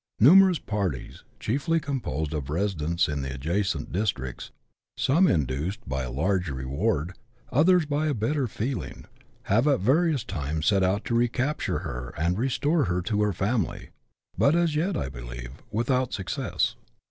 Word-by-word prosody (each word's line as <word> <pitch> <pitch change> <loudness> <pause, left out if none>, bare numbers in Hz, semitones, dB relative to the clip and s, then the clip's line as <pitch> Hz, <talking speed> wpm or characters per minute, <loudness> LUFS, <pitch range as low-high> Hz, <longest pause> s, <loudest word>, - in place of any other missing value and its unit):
Numerous 185 - +7
parties, 100 - -3 0.2
chiefly 145 +8 0
composed 125 - -3
of 70 -3 -3
residents 85 -1 0
in 75 -2 -2
the 65 0 -4
adjacent 80 +3 -1
districts, 85 - -2 0.5
some 170 +8 +4
induced 80 - -1
by 65 0 -2
a 65 -1 -4
large 90 +6 0
reward, 75 - -1 0.4
others 170 +5 +4
by 150 +1 0
a 145 - 0
better 130 +5 0
feeling, 120 +4 -4 0.4
have 115 +8 +2
at 140 -3 +3
various 145 - +2
times 80 -3 -3
set 100 -2 +4
out 95 +3 +1
to 120 - -2
recapture 120 +5 0
her 60 0 -6
and 85 +5 0
restore 145 +4 +1
her 90 0 -1
to 105 +2 0
her 105 0 +2
family, 100 +2 -2 0.5
but 140 +3 +4
as 170 -3 +2
yet, 180 +6 0
I 65 - -2
believe, - - -8 0.2
without 125 +3 0
success. 95 -3 -1
100 Hz, 150 wpm, -26 LUFS, -, 0.5 s, Numerous